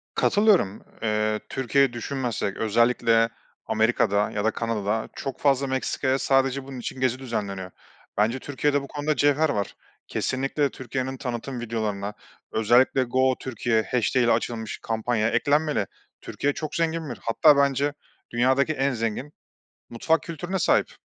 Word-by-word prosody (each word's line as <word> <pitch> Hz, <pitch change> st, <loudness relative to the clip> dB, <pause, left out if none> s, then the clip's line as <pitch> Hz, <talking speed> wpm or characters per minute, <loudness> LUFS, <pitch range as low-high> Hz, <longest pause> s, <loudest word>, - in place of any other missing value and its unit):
Katılıyorum. 200 Hz, -, +3 dB, 0.2 s
Eee, 110 Hz, -1 st, 0 dB
Türkiye'yi 135 Hz, 0 st, +2 dB
düşünmezsek, 120 Hz, -4 st, -3 dB
özellikle 115 Hz, +1 st, +3 dB, 0.4 s
Amerika'da 100 Hz, +1 st, +2 dB
ya 105 Hz, 0 st, -2 dB
da 110 Hz, -, +3 dB
Kanada'da 110 Hz, -2 st, -2 dB
çok 135 Hz, -2 st, -5 dB
fazla 140 Hz, -1 st, +2 dB
Meksika'ya 130 Hz, 0 st, 0 dB
sadece 135 Hz, 0 st, +2 dB
bunun 135 Hz, -1 st, -8 dB
için 125 Hz, -, -6 dB
gezi 130 Hz, -1 st, +1 dB
düzenleniyor. 100 Hz, -7 st, -4 dB, 0.5 s
Bence 110 Hz, +5 st, +2 dB
Türkiye'de 145 Hz, +1 st, 0 dB
bu 140 Hz, -, -8 dB
konuda 150 Hz, 0 st, -1 dB
cevher 145 Hz, +2 st, +3 dB
var. 100 Hz, -7 st, -2 dB, 0.3 s
Kesinlikle 135 Hz, +2 st, -1 dB
Türkiye'nin 130 Hz, 0 st, -4 dB
tanıtım 125 Hz, 0 st, -4 dB
videolarına, 105 Hz, -3 st, -3 dB, 0.4 s
özellikle 120 Hz, +4 st, +4 dB
#GoTürkiye'i 125 Hz, -1 st, +1 dB
ile 120 Hz, -, +3 dB
açılmış 110 Hz, -1 st, -2 dB
kampanya 110 Hz, 0 st, 0 dB
eklenmeli. 145 Hz, -4 st, +1 dB, 0.3 s
Türkiye 145 Hz, 0 st, -2 dB
çok 155 Hz, 0 st, -5 dB
zengin 165 Hz, -2 st, -1 dB
bir 120 Hz, -, -5 dB
hatta 145 Hz, +6 st, +5 dB
bence 140 Hz, +1 st, +2 dB, 0.4 s
dünyadaki 130 Hz, +5 st, +2 dB
en 140 Hz, -1 st, +1 dB
zengin 115 Hz, +5 st, -3 dB, 0.6 s
mutfak 160 Hz, +8 st, +1 dB
kültürüne 175 Hz, +3 st, -4 dB
sahip. -, -, +2 dB
130 Hz, 130 wpm, -25 LUFS, 115-140 Hz, 0.6 s, hatta